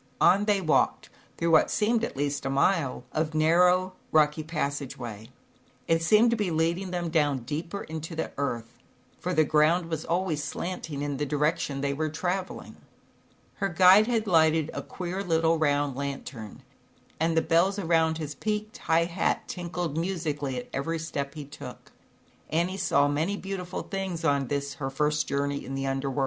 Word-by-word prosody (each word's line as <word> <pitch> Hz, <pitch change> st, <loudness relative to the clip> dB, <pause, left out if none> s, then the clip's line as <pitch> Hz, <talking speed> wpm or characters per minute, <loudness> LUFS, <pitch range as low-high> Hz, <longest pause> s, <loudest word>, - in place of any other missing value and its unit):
On 200 Hz, +2 st, +5 dB
they 205 Hz, -2 st, +2 dB
walked 155 Hz, -4 st, +1 dB, 0.3 s
through 170 Hz, 0 st, +1 dB
what 160 Hz, -, +5 dB
seemed, 225 Hz, +2 st, +1 dB
at 230 Hz, -, -3 dB
least, 145 Hz, 0 st, -1 dB
a 135 Hz, -, -2 dB
mile 140 Hz, -1 st, +1 dB
of 155 Hz, 0 st, -1 dB
narrow, 180 Hz, +4 st, +4 dB, 0.2 s
rocky 155 Hz, 0 st, +3 dB
passage 145 Hz, -4 st, -3 dB
way. 110 Hz, -1 st, -8 dB, 0.6 s
It 165 Hz, 0 st, +2 dB
seemed 215 Hz, +8 st, +5 dB
to -, -, +3 dB
be 210 Hz, -4 st, -1 dB
leading 170 Hz, +4 st, 0 dB
them 175 Hz, -2 st, -2 dB
down 145 Hz, -6 st, +1 dB
deeper 160 Hz, +9 st, -4 dB
into 160 Hz, +1 st, -6 dB
the 160 Hz, -, -3 dB
earth, 120 Hz, -4 st, -4 dB, 0.4 s
for 180 Hz, -, -3 dB
the 155 Hz, -, +5 dB
ground 160 Hz, +3 st, +2 dB
was 160 Hz, -1 st, -2 dB
always 170 Hz, -4 st, -1 dB
slanting 150 Hz, -1 st, -4 dB
in 145 Hz, -1 st, -2 dB
the 145 Hz, -, -1 dB
direc 150 Hz, +2 st, +1 dB
tion 140 Hz, -1 st, -3 dB
they 140 Hz, 0 st, 0 dB
were 155 Hz, +2 st, -1 dB
traveling. 180 Hz, +4 st, -4 dB, 0.8 s
Her 195 Hz, -, 0 dB
guide 185 Hz, +4 st, +6 dB
had 230 Hz, -3 st, +1 dB
lighted 160 Hz, -4 st, +3 dB
a -, -, -3 dB
queer 185 Hz, +2 st, -5 dB
little 165 Hz, -2 st, +2 dB
round 145 Hz, -3 st, +1 dB
lantern, 135 Hz, -6 st, -6 dB, 0.6 s
and 165 Hz, +1 st, +1 dB
the 160 Hz, -, +4 dB
bells 175 Hz, +5 st, +3 dB
around 160 Hz, -3 st, +2 dB
his 155 Hz, -2 st, -5 dB
peaked 215 Hz, -, -3 dB
high 165 Hz, +1 st, +2 dB
hat 175 Hz, +2 st, -1 dB
tinkled 175 Hz, -3 st, -4 dB
musically 150 Hz, -7 st, -2 dB
at 125 Hz, -, -5 dB
every 165 Hz, +5 st, -1 dB
step 145 Hz, -3 st, -4 dB
he 150 Hz, -2 st, -6 dB
took. 140 Hz, -3 st, -11 dB, 0.6 s
Annie 170 Hz, +4 st, 0 dB
saw 145 Hz, -7 st, +2 dB
many 160 Hz, +8 st, 0 dB
beautiful 190 Hz, -2 st, -5 dB
things 190 Hz, -4 st, -4 dB
on 140 Hz, -3 st, +2 dB
this 140 Hz, 0 st, -2 dB
her 135 Hz, -, -1 dB
first 150 Hz, +2 st, 0 dB
journey 140 Hz, 0 st, -1 dB
in 135 Hz, -, -5 dB
the 135 Hz, 0 st, -2 dB
Under 135 Hz, 0 st, -1 dB
World. 135 Hz, -, -3 dB
160 Hz, 175 wpm, -27 LUFS, 145-180 Hz, 0.8 s, guide